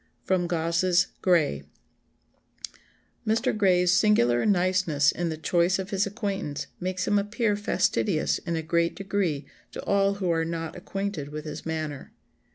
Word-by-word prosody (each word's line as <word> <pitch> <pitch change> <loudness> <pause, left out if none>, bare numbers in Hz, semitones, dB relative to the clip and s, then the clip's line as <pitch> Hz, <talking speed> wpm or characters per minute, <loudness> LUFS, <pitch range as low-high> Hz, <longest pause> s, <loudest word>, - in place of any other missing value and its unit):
[Sidenote: 180 -2 +1
Gosse's 170 +2 +2
Gray.] 160 - +2 1.6
"Mr. 225 +3 +1
Gray's 180 -4 +3
singular 180 - +3
niceness 180 -6 +2
in 170 0 -2
the 160 - -4
choice 175 +3 +2
of 190 +1 -5
his 195 0 +1
acquaintance 200 -8 -3
makes 185 0 -2
him 205 0 +3
appear 210 +1 0
fastidious 200 -3 0
in 170 -1 -3
a 160 - -2
great 170 +1 +1
degree 195 -7 -1 0.3
to - - -7
all 200 0 +2
who 185 -3 -1
are 165 -1 +1
not 165 0 -4
acquainted 195 -4 -4
with 150 +1 -7
his 150 +1 -7
manner. 155 -3 -4
180 Hz, 145 wpm, -26 LUFS, 160-200 Hz, 1.6 s, Gray's